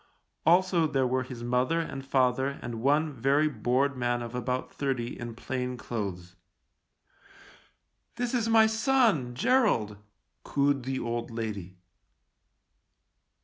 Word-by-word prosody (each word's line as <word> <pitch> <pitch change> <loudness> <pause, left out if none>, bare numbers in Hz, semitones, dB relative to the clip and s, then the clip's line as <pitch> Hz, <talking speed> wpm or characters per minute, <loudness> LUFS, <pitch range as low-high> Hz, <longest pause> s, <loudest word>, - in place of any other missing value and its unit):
Also 175 -1 +4
there 135 -3 +1
were 130 +1 +1
his 125 -2 -7
mother 125 +7 +1
and 140 -5 -4
father 130 -1 +2 0.2
and 115 -2 -5
one 150 +4 +2
very 140 +5 +2
bored 135 +2 0
man 120 -1 -1
of 120 0 -7
about 125 +1 -3
thirty 130 -4 -2
in 120 -1 -6
plain 125 +1 -4
clothes. 95 -7 -5 0.9
" - - -26
This 245 0 -2
is 230 -2 +1
my 225 -1 +6
son, 220 - +2
Gerald," 130 - +2 0.5
cooed 140 -2 +1
the 130 0 -2
old 120 0 -3
lady. 105 -6 -5
130 Hz, 125 wpm, -28 LUFS, 120-155 Hz, 0.9 s, my